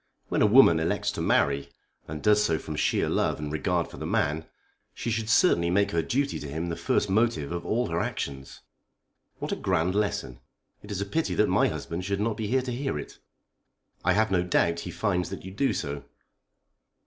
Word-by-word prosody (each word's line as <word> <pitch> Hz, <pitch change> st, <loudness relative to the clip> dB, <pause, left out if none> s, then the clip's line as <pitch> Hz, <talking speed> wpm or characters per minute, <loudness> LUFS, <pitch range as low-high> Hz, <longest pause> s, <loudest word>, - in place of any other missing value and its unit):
When -, -, 0 dB
a 105 Hz, -, +6 dB
woman 105 Hz, -8 st, +7 dB
elects 80 Hz, +1 st, 0 dB
to -, -, -5 dB
marry, 70 Hz, 0 st, +1 dB, 0.4 s
and 75 Hz, -1 st, -6 dB
does 105 Hz, 0 st, +5 dB
so 80 Hz, -6 st, +1 dB
from 80 Hz, -1 st, -6 dB
sheer 75 Hz, -, +1 dB
love -, -, +1 dB
and 75 Hz, -1 st, -5 dB
regard 75 Hz, -2 st, 0 dB
for -, -, -12 dB
the -, -, -5 dB
man, 75 Hz, +2 st, 0 dB, 0.5 s
she 115 Hz, -, -3 dB
should 110 Hz, -1 st, -2 dB
certainly 85 Hz, -, +4 dB
make 100 Hz, +3 st, +2 dB
her 85 Hz, -, +1 dB
duty 140 Hz, -, -1 dB
to 75 Hz, -, -6 dB
him 80 Hz, +4 st, -3 dB
the 85 Hz, -, -2 dB
first 105 Hz, -, 0 dB
motive 95 Hz, -7 st, +1 dB
of 85 Hz, 0 st, -3 dB
all 120 Hz, -1 st, 0 dB
her 85 Hz, 0 st, -1 dB
actions." 65 Hz, -4 st, -4 dB, 0.8 s
"What -, -, -5 dB
a -, -, +1 dB
grand 85 Hz, +3 st, 0 dB
lesson! 100 Hz, -12 st, -1 dB, 0.4 s
It 105 Hz, -, -13 dB
is 100 Hz, -2 st, -3 dB
a -, -, -1 dB
pity 100 Hz, -, -1 dB
that -, -, +3 dB
my -, -, +3 dB
husband 85 Hz, +2 st, -4 dB
should 100 Hz, +1 st, -2 dB
not 110 Hz, +1 st, 0 dB
be 110 Hz, -, -3 dB
here 130 Hz, +4 st, +1 dB
to 125 Hz, -, -4 dB
hear 135 Hz, -, -2 dB
it." -, -, -8 dB, 0.8 s
"I -, -, +3 dB
have 110 Hz, 0 st, +2 dB
no 90 Hz, -2 st, +3 dB
doubt 85 Hz, -1 st, +1 dB
he -, -, -6 dB
finds 90 Hz, -5 st, -1 dB
that 95 Hz, -3 st, -7 dB
you 95 Hz, -, -7 dB
do 135 Hz, +8 st, +1 dB
so." 70 Hz, 0 st, -4 dB
90 Hz, 210 wpm, -27 LUFS, 80-105 Hz, 0.8 s, woman